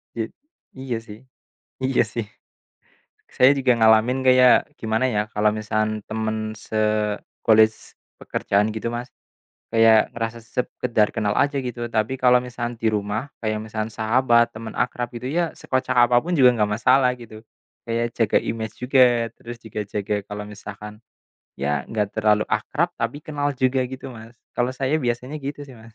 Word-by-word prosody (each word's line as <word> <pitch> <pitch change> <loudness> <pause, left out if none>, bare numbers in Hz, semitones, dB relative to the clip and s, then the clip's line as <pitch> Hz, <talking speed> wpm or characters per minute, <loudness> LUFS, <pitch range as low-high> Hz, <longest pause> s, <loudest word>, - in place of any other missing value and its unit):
Ja 115 -1 -1 0.5
iya 130 -3 -3
sih. 105 +1 -10 0.7
Iya 130 -2 +3
sih. 115 - -2 1.1
Saya 130 +2 +6
juga 130 -2 +3
ngalamin 110 +3 +4
kayak 130 +3 +5
gimana 110 +3 0
ya 105 - +3
kalau 105 0 +3
misal 110 0 -2 0.3
teman 110 0 -2 0.3
se - - -7 0.7
colleague 110 0 +5 0.5
pekerjaan 100 +1 0
gitu 110 - -3
Mas, 120 +1 -5 0.6
kayak 115 -1 +5
ngerasa 115 0 -3 0.2
sekedar 120 -3 +1
kenal 105 -2 0
aja 145 0 -2
gitu. 120 -1 -6
Tapi 110 +3 0
kalau 125 0 +6
misal 120 0 -4
di 115 - +2
rumah, 105 +1 -2 0.2
kayak 110 -1 -1
misal 110 0 -3
sahabat, 120 +1 +2
teman 110 0 -7
akrab 120 0 -1
gitu 120 +2 -5
ya 170 +2 0
sekocak 130 -1 -1
apapun 125 +8 +2
juga 125 -2 +8
nggak 105 -2 +1
masalah 130 +1 +4
gitu. 110 -2 -12 0.4
Kayak 115 0 -1
jaga 115 -3 +3
image 110 -1 -4
juga, 130 +1 +3 0.4
terus 120 0 -9
juga 110 -2 -5
jaga 105 +1 -2
kalau 105 0 -6
misalkan, 105 0 -9 0.7
ya 70 +1 -1
nggak 105 -3 -1
terlalu 105 -1 +3
akrab, 140 - 0
tapi 115 +6 -3
kenal 145 -2 -2
juga 130 0 +1
gitu 130 +1 -8
Mas. 115 +1 -12 0.2
Kalau 120 +1 +1
saya 135 +3 0
biasanya 125 +2 -3
gitu 145 +1 -6
sih 135 -3 -13
Mas. 110 0 -16
115 Hz, 155 wpm, -23 LUFS, 110-130 Hz, 1.1 s, juga